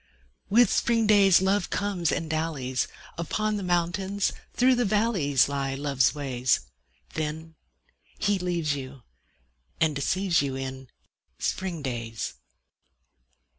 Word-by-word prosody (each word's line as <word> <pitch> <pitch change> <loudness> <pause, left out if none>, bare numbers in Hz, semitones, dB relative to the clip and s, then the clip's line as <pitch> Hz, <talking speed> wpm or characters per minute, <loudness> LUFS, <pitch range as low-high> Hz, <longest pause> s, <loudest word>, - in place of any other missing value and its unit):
With 235 +4 +5
spring 230 -1 +2
days 195 -3 +6
Love 190 -1 +1
comes 190 -5 0
and 165 - -2
dallies: 155 -6 -1 0.3
Upon 215 +5 -1
the - - -4
mountains, 190 +3 0 0.2
through 255 +1 +4
the 245 0 +2
valleys 200 - +2
Lie 135 -1 -2
Love's 135 -1 +1
ways. 130 -3 0 0.5
Then 155 +1 -4 0.6
he 205 -2 +1
leaves 170 -4 0
you 130 -2 -8 0.8
and 160 -2 +2
deceives 175 +4 +1
you 135 -2 -2
In 130 -1 -6 0.5
spring 180 -5 -3
days. 115 - -4
165 Hz, 115 wpm, -27 LUFS, 135-195 Hz, 0.8 s, days